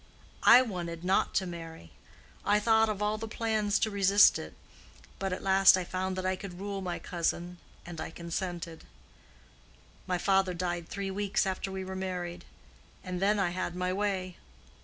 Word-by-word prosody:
I 250 +2 +8
wanted 175 -7 -5
not 190 +2 +1
to 190 - +2
marry. 165 - -9 0.5
I 205 +1 +3
thought 220 0 +3
of 210 -1 -2
all 210 +1 0
plans 220 -2 0
to 220 - 0
resist 200 0 +5
it, - - -9 0.6
but 195 -1 -2
at 185 - -4
last 190 0 +6
I 185 - -1
found 185 +1 -3
that 185 0 -4
I 185 0 +1
could 185 -2 -9
rule 200 0 -4
my 180 -2 -3
cousin, 175 0 -3 0.3
and 170 -2 -7
I - - -4
consented. 170 0 -5 1.2
My 180 -1 0
father 190 0 +2
died 175 -1 -3
three 200 -1 -4
weeks 200 0 0
after 190 0 -3
we 190 0 -5
were 190 0 -6
married, 180 -2 -4 0.6
and 180 -1 -4
then 205 +2 +3
I 190 -3 +1
had 180 -1 -3
my 180 0 -1
way!" 190 -2 -2
185 Hz, 170 wpm, -30 LUFS, 175-200 Hz, 1.2 s, I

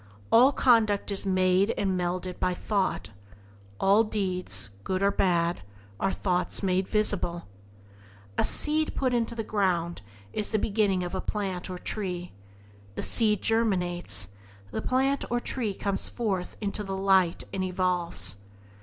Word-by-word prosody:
All 250 +4 +7
conduct 220 -7 +3
is 195 0 -1
made 185 +2 +2
and 195 - 0
melded 180 0 -2
by 180 - 0
thought; 175 - -1 0.7
all 200 +3 +5
deeds, 185 - -2
good 185 - -1
or 200 - +4
bad, 175 -3 +1 0.4
are 195 - +1
thoughts 180 +1 -1
made 185 0 +1
visible. 200 -5 0 0.9
A - - +2
seed 310 +1 +1
put 255 -2 0
into 235 -1 0
the 225 - -3
ground 180 -5 -1 0.3
is 210 - -2
the 220 - +2
beginning 200 -3 +1
of 175 - -5
a 190 - -2
plant 190 -4 -3
or 180 - -5
tree; 180 -2 -4 0.6
the - - -3
seed 210 -4 +3
germinates, 175 - +1 0.4
the - - -3
plant 270 +2 +1
or 240 - +1
tree 230 -5 -3
comes 200 0 +1
forth 195 -7 -3
into 210 0 -2
the 195 -1 -4
light 190 -3 +3
and 190 -1 -1
evolves. 180 - +2
195 Hz, 145 wpm, -27 LUFS, 180-215 Hz, 0.9 s, All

